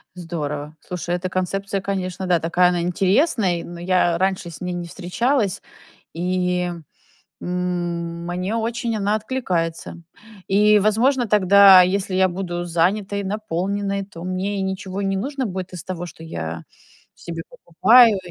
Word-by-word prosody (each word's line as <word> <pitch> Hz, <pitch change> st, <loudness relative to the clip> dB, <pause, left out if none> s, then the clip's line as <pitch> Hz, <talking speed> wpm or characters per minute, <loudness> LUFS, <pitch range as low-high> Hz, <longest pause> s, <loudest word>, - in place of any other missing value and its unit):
Здорово. 150 Hz, -4 st, -5 dB
Слушай, 175 Hz, -1 st, -4 dB
эта 180 Hz, +1 st, -3 dB
концепция, 195 Hz, +2 st, -2 dB
конечно, 190 Hz, -1 st, -3 dB
да, 175 Hz, -2 st, +3 dB
такая 175 Hz, +2 st, +3 dB
она 175 Hz, -1 st, 0 dB
интересная, 185 Hz, -, +1 dB
но 175 Hz, 0 st, -9 dB
я 175 Hz, -1 st, +2 dB
раньше 190 Hz, -1 st, -1 dB
с 165 Hz, -, -11 dB
ней 180 Hz, 0 st, -3 dB
не 175 Hz, -1 st, -5 dB
встречалась. 200 Hz, -, -1 dB, 0.5 s
И, 180 Hz, +1 st, -1 dB, 0.7 s
м, 175 Hz, -1 st, -3 dB
мне 180 Hz, +4 st, -2 dB
очень 230 Hz, 0 st, -2 dB
она 205 Hz, +1 st, +1 dB
откликается. 180 Hz, -8 st, -3 dB, 0.5 s
И, 210 Hz, +2 st, +5 dB
возможно, 235 Hz, +5 st, +2 dB
тогда, 200 Hz, -2 st, +7 dB
если 185 Hz, +1 st, -1 dB
я 190 Hz, 0 st, +4 dB
буду 175 Hz, -1 st, -4 dB
занятой, 195 Hz, +4 st, 0 dB
наполненной, 200 Hz, 0 st, -2 dB
то 170 Hz, -4 st, -11 dB
мне 185 Hz, +3 st, -2 dB
и -, -, -1 dB
ничего 190 Hz, 0 st, -4 dB
не 195 Hz, -1 st, 0 dB
нужно 270 Hz, +5 st, -3 dB
будет 185 Hz, -3 st, -5 dB
из 175 Hz, -4 st, -7 dB
того, 175 Hz, -2 st, -5 dB
что 165 Hz, -, -12 dB
я 80 Hz, -, -5 dB, 0.5 s
себе 165 Hz, -1 st, -7 dB
покупаю. 225 Hz, +2 st, +5 dB
185 Hz, 140 wpm, -21 LUFS, 175-200 Hz, 0.7 s, тогда